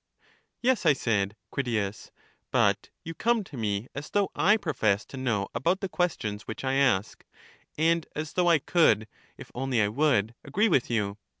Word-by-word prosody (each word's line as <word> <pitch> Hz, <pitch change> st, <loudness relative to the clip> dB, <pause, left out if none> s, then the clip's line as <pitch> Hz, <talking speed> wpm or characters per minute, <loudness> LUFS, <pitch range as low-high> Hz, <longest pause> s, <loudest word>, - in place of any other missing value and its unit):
Yes, 255 Hz, -2 st, +2 dB
I 150 Hz, -, +7 dB
said, 105 Hz, -6 st, -1 dB, 0.2 s
Critias; 110 Hz, -6 st, -2 dB, 0.4 s
but -, -, +2 dB
you 165 Hz, -, -6 dB
come 230 Hz, +5 st, +1 dB
to 165 Hz, -, -12 dB
me 105 Hz, -1 st, -2 dB
as 140 Hz, +2 st, -6 dB
though 205 Hz, -1 st, +1 dB
I 210 Hz, +3 st, +4 dB
professed 110 Hz, -, 0 dB
to -, -, -9 dB
know 115 Hz, -7 st, -1 dB
about 180 Hz, +3 st, +1 dB
the 195 Hz, -, -3 dB
questions 110 Hz, -, -2 dB
which 110 Hz, -, -6 dB
I 130 Hz, 0 st, 0 dB
ask, 130 Hz, -8 st, +1 dB, 0.5 s
and 165 Hz, +1 st, +2 dB
as 155 Hz, 0 st, -4 dB
though 180 Hz, -1 st, +2 dB
I 165 Hz, -, +6 dB
could, 145 Hz, -7 st, +3 dB, 0.3 s
if -, -, -11 dB
only 130 Hz, -1 st, -1 dB
I 105 Hz, -1 st, +3 dB
would, 120 Hz, -3 st, +1 dB
agree 205 Hz, +11 st, +1 dB
with 135 Hz, -8 st, +2 dB
you. 105 Hz, -3 st, -1 dB
135 Hz, 175 wpm, -27 LUFS, 105-170 Hz, 0.5 s, I